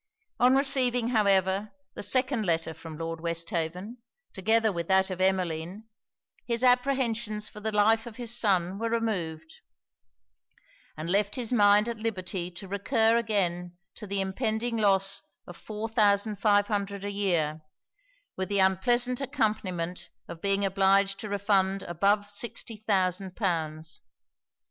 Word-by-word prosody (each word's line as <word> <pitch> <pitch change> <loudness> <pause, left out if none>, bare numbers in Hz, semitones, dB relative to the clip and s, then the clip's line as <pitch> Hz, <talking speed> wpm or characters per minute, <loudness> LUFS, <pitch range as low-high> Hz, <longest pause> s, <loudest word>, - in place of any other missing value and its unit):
On 250 +2 +5
receiving, 250 -3 +2
however, 200 -2 +2 0.2
the - - -7
second 255 +2 +1
letter 165 -3 0
from 160 0 -10
Lord 165 0 -5
Westhaven, 170 +5 -3 0.4
together 220 +3 +2
with 170 -2 -4
that 190 0 +3
of 185 0 -4
Emmeline, 185 0 -1 0.6
his 235 0 -1
apprehensions 245 -4 +1
for 210 - -11
the 220 +1 -2
life 220 +2 +3
of 230 - -9
his 240 -1 -1
son 195 -4 +1
were 230 0 -1
removed, 175 -9 -3 1.4
and 155 +2 -5
left 200 +3 +1
his 245 -1 -1
mind 205 -1 +5
at 235 -2 -4
liberty 185 -5 -3
to 180 +2 -10
recur 220 +4 +2
again 180 -6 -1 0.2
to 210 - -9
the 195 0 -1
impending 220 +4 -2
loss 195 -2 +2 0.2
of 175 - -10
four 215 +5 -6
thousand 210 -1 +2
five 205 0 +3
hundred 200 -2 -3
a 205 - -3
year, 170 -6 0 0.7
with 190 0 -3
the 200 - 0
unpleasant 240 +7 +2
accompanyment 185 -8 -2 0.2
of 165 - -9
being 200 0 +2
obliged 195 0 +2
to 215 - -6
refund 195 -1 +1
above 200 +4 +1
sixty 225 +2 -4
thousand 190 -3 -1
pounds. 160 -5 -2
200 Hz, 140 wpm, -28 LUFS, 185-225 Hz, 1.4 s, On